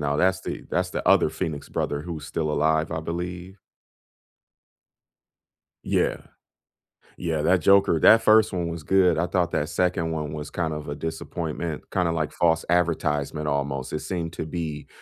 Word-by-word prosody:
Now, 75 0 0
that's 95 +2 +2
the - - -6
that's - - 0
the - - -4
other - - +5
Phoenix 80 -2 -4
brother 70 0 -2
who's 80 -3 -6
still 80 -1 -2
alive, 80 +2 +1
I 80 - -2
believe. 90 +3 -5 2.3
Yeah. - - +1 1.0
Yeah, 80 -3 -1
that 90 +2 +3
Joker 100 -1 +5
that 115 - +7
1st 110 0 +5
one 90 -2 -2
was 85 -2 -5
good. 90 -2 +3
I 85 - +1
thought 90 -3 0
that 75 +2 -1
2nd 85 -2 0
one 75 -2 -3
was 75 -1 -6
kind 80 -3 -2
of 75 -1 -6
a 75 - -3
disappointment, 80 0 -5
kinda, 90 -3 +1
like, 80 -2 -1
false 80 -1 +2
advertisement 75 -3 0
almost. 70 -2 -2
It 75 - -1
seemed 85 -2 -4
to - - -4
be 80 -3 -5
80 Hz, 165 wpm, -25 LUFS, 75-90 Hz, 2.3 s, that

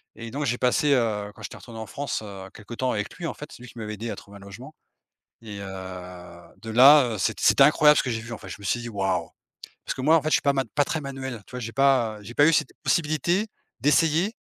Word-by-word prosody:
et 115 -1 -8
donc 145 +4 -3
j'ai 125 -2 0
passé, 130 +4 +2
heu, 105 -5 0
quand - - -15
j'étais 100 - -8
retourné 115 -2 -11
en 110 - -5
France, 140 -3 -4
heu, 95 -2 -9
quelque 105 +3 -11
temps 130 +2 -1
avec 105 -1 -3
lui, 175 - -4
en - - -4
fait. 150 - -10
C'est - - -13
lui 125 - -10
qui - - -16
m'avait 105 -1 -5
aidé 115 +3 -6
à - - -4
trouver 100 0 -13
un - - -15
logement 100 -1 -11 0.7
et 105 -3 -8
heu, 100 - -6 1.0
de 115 - -6
là, 130 +1 +7
heu, - - -5
c'est - - -1
c'était - - +5
incroyable 150 0 +6
ce - - +3
que 125 - -3
j'ai 115 - -2
vu 115 +1 -9
en 115 - -6
fait - - -11
je - - -7
me 100 - -13
suis 120 +5 0
dit: 120 - -6
«Waouh!» 95 -5 -1 0.6
Parce - - -3
que 130 - -5
moi 155 +5 +5
en 160 - +4
fait 155 - -1
je - - 0
suis - - +1
pas 140 - +2
man 135 -1 0
pas 145 -1 +3
très 160 - -2
manuel, 135 -4 -6
tu - - -17
vois? 125 - -5
J'ai 115 -1 -5
pas, 130 -6 +2
heu, 105 - -15
j'ai 120 - -9
pas 145 - +6
eu 165 - +4
cette 145 - +2
possibilité 165 - +1 0.3
d'essayer 160 - +2
125 Hz, 280 wpm, -25 LUFS, 110-145 Hz, 1.0 s, là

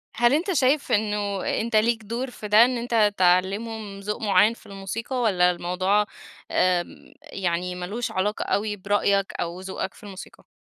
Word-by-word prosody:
هل 240 +2 +3
أنت 340 +7 +1
شايف 275 0 +2
إنه 205 -2 0 0.2
أنت 230 0 -2
ليك 220 +1 +2
دور 240 +5 -4
في 215 - -8
ده، 215 +3 +7
إن 250 0 -1
أنت 230 -3 +2
تعلمهم 195 +3 +1
ذوق 210 +3 -4
معين 205 +1 +4
في - - -18
الموسيقى، 200 +6 -5
والّا 180 -6 +3
الموضوع 185 +4 0 0.5
آآ 180 -1 +2 0.4
يعني 180 -1 -3
مالوش 200 +7 -4
علاقة 205 +3 -1
أوي 210 +1 -1
برأيك 200 0 0
أو 170 +1 -4
ذوقك 190 0 -5
في - - -18
الموسيقى؟ 195 -2 -11
205 Hz, 160 wpm, -24 LUFS, 190-225 Hz, 0.5 s, ده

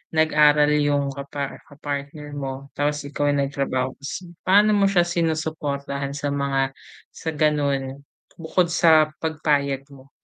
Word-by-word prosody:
nag-aral 150 -1 +4
yung 145 -1 +1
kapa 140 0 -6
kapartner 145 +1 -6
mo 135 0 -6
tapos 145 0 -1
ikaw 145 0 -2
ay 145 - +2
nagtrabaho 130 -2 -2
ka - - -25
s 180 +6 -5 0.2
paano 205 +3 +6
mo 200 -1 +4
siya 175 -3 +4
sinusuportahan 155 -4 -2
sa 145 0 -2
mga 135 -1 0 0.4
sa 160 - -5
gano'n 140 -3 0 0.4
bukod 170 +2 +1
sa 160 -2 +5 0.2
pagpayag 145 -4 0
mo? 135 0 -16
145 Hz, 135 wpm, -23 LUFS, 140-155 Hz, 0.4 s, paano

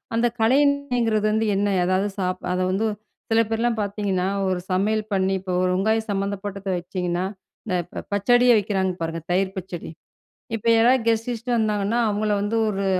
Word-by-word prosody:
அந்த 240 +1 +3
கலைநயங்கிறது 250 -4 +2
வந்து 220 +1 +1
என்ன? 205 +1 +1 0.2
எதாவது 185 +3 +1
சாப் 185 -1 -2
அத 180 - 0
வந்து 215 +4 0 0.4
சில 225 0 +5
பேர்லாம் 225 0 0
பார்த்தீங்கன்னா 200 -2 -1 0.2
ஒரு 185 -1 0
சமையல் 215 +3 +1
பண்ணி 190 0 +1
இப்போ 185 0 -6
ஒரு 185 - +2
வெங்காயம் 220 +4 +1
சம்மந்தப்பட்டத 200 0 -3
வச்சிங்கன்னா 180 0 -2 0.4
இந்த 185 -4 -1
இப்ப 175 - -21
ப - - -20
பச்சடியை 245 +4 +4
வைக்கிறாங்க 190 -2 0
பாருங்க, 165 0 -2
தயிர் 190 +1 0
பச்சடி. 180 -2 -6 0.7
இப்ப 225 - -10
யாராவது 240 +1 +4
கெஸ்ட் 225 +1 +1
கிஸ்ட்டு 240 +1 -2
வந்தாங்கன்னா, 210 +1 0
அவுங்கள 210 0 0
வந்து 205 +3 -1
ஒரு 200 -1 -2
205 Hz, 160 wpm, -23 LUFS, 190-225 Hz, 0.7 s, சில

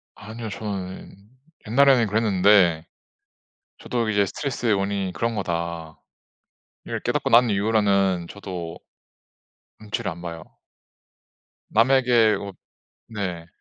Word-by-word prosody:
아니요. 110 +2 -8
저는 100 -2 -6 0.5
옛날에는 130 -1 +4
그랬는데 95 -5 +3 0.9
저도 120 -2 -2
이제 100 -2 +2
'스트레스의 120 -2 -1
원인이 100 -1 -2
그런 115 -1 -2
거다.'를 85 -4 -5 0.8
깨닫고 - - -1
난 120 0 +6
이후로는 100 -4 +1
저도 90 -5 -7 1.0
눈치를 110 -1 -4
안 85 +1 -10
봐요. 85 -1 -7 1.3
남에게 120 -2 +4
어 100 -1 -7 0.6
네. 90 -6 -5
100 Hz, 225 characters per minute, -23 LUFS, 90-115 Hz, 1.3 s, 난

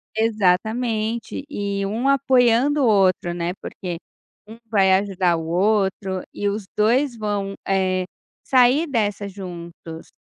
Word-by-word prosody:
Exatamente 220 +3 0
e 200 -5 -2
um 225 +7 -2
apoiando 265 +1 +3
o 245 - +4
outro, 185 -4 +2
né, 175 +1 -2
porque 180 -3 -6 0.5
um 225 +2 -11
vai 195 -4 +3
ajudar 190 -3 +1
o 165 -1 -4
outro 190 +1 0
e 205 - -2
os 205 -1 -4
2 240 +5 +2
vão, 205 -2 -2
eh, 185 -1 +1 0.4
sair 260 +5 +4
dessa 205 -5 -1
juntos. 170 -4 -9
205 Hz, 125 wpm, -22 LUFS, 185-230 Hz, 0.5 s, o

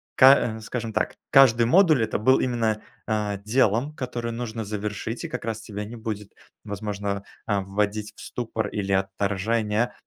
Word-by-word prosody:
ка 130 -4 +6
э, - - -9
скажем 115 0 -4
так, - - 0 0.2
каждый 125 -4 +6
модуль 155 - +5
это - - -1
был 130 +5 +4
именно, 115 -4 0 0.3
э, 105 -2 -1
делом, 120 +4 +2
которое 120 -3 -4
нужно 115 -1 -4
завершить? 105 +2 -4
И - - -4
как 125 - -5
раз 115 -1 -3
тебя 105 -1 -6
не 115 - -8
будет, 110 -3 -6 0.3
возможно, 100 -1 -3 0.2
э, 100 -2 +2
вводить 105 +2 -2
в - - -13
ступор 115 -2 -3
или 100 -2 -3
отторжение, 105 +4 0
110 Hz, 160 wpm, -25 LUFS, 105-120 Hz, 0.3 s, ка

